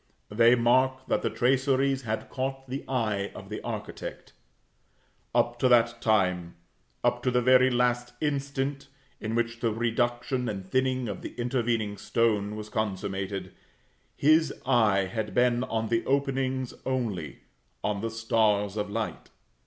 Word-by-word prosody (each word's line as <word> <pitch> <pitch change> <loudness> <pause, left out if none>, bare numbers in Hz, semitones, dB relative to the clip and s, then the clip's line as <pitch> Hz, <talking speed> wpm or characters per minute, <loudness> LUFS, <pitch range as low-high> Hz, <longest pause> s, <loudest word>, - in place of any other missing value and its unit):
They 115 +3 +6
mark 130 +2 +2
that - - +2
the - - 0
traceries 135 +1 +2
had 110 -3 -3
caught 135 0 -3
the 135 +2 -4
eye 110 -6 -1
of - - -10
the - - -5
architect. - - -6 1.0
Up 120 0 +2
to 130 - +3
that 115 -1 +4
time, 90 -5 +1 0.5
up - - +2
to 130 - +1
the 125 0 +2
very 130 +1 +5
last 120 0 0
instant 140 -1 -2 0.3
in 110 +1 -3
which 120 0 -1
the 115 -2 +1
reduction 120 +2 0
and 95 -2 -5
thinning 130 +3 0
of 100 - -5
the - - -8
intervening 120 -4 -1
stone 105 -2 0
was 105 0 -6
consummated, 95 -2 -3 0.6
his 155 +1 +4
eye 110 -7 +3
had 105 +3 -4
been 125 0 +3
on 110 -1 -2
the 115 0 +1
openings 135 -2 0
only, 110 - -3 0.4
on 100 -1 -1
the 115 - -2
stars 110 -3 +1
of 105 -1 -2
light. 110 +1 -4
120 Hz, 145 wpm, -28 LUFS, 110-130 Hz, 1.0 s, They